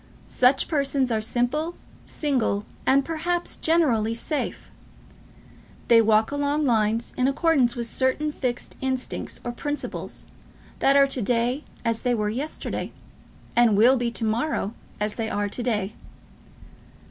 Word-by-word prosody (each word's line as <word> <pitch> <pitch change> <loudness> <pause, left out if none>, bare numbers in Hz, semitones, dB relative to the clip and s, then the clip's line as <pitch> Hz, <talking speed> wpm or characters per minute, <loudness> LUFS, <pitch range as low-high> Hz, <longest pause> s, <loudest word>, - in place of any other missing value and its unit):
Such 255 +2 +3
persons 275 -4 +1
are 220 -1 +1
simple, 250 +9 0 0.3
single, 250 -8 -1 0.2
and, 275 +1 +4
perhaps, 340 +2 -2
generally, 245 -10 +2
safe. 295 +5 -3 1.2
They 230 -1 +7
walk 220 +1 +3
along 285 +1 0
lines 225 -1 +1
in 255 - +2
accordance 275 -4 +2
with 240 -1 -2
certain 260 +6 0
fixed 250 -4 -4
instincts 260 -1 -3
or 240 - -3
principles, 290 +4 -5 0.6
and 275 +1 +5
are 280 - +7
to 270 -2 -2
day 245 +5 0 0.2
as 230 -1 0
they 245 -1 +1
were 210 -2 0
yesterday, 270 +8 -4 0.6
and 235 -4 +5
will 240 +5 +6
be 240 -2 0
to 230 -1 -3
morrow 225 -1 -1 0.3
as 210 0 -1
they 225 -2 -3
are 205 0 -1
to 245 - -3
day. 215 -4 -1
250 Hz, 135 wpm, -25 LUFS, 225-285 Hz, 1.2 s, They